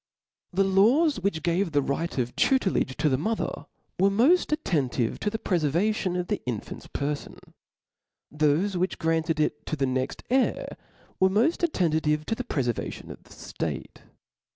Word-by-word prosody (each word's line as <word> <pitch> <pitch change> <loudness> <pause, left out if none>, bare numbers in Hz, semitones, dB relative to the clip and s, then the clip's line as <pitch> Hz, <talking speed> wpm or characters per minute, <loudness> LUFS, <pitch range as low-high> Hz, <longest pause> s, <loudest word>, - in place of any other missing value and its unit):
nr^HE 195 0 +2
laws 275 +9 +4
which 190 -4 -1
gave 175 0 0
the 145 - +3
right, 140 +5 -2
of 125 -1 -1
tutelagf 260 -8 +2
^ 130 - -9
to - - +1
the 130 -3 +2
mother, 220 +8 -2 0.3
were 195 +2 +5
moft 255 - +4
attenti^ 140 - -1
to 210 - 0
the 220 - -3
prefervatton 180 +2 0
of 180 - -2
the - - -2
infant's 115 -5 -5
perfon; 145 +1 -4 1.0
thofe 155 +6 +2
which 185 +1 -1
granted 160 -1 0
it 150 -1 0
to - - -1
the 140 -2 0
next 130 0 -2
heir, 260 0 +1 0.4
were 190 - +5
moft 230 - +2
attentive 160 - +1
to - - -1
the 250 - -3
prefervation 125 - -3
of - - -11
the - - -20
ilate. - - -5
175 Hz, 160 wpm, -26 LUFS, 150-205 Hz, 1.0 s, were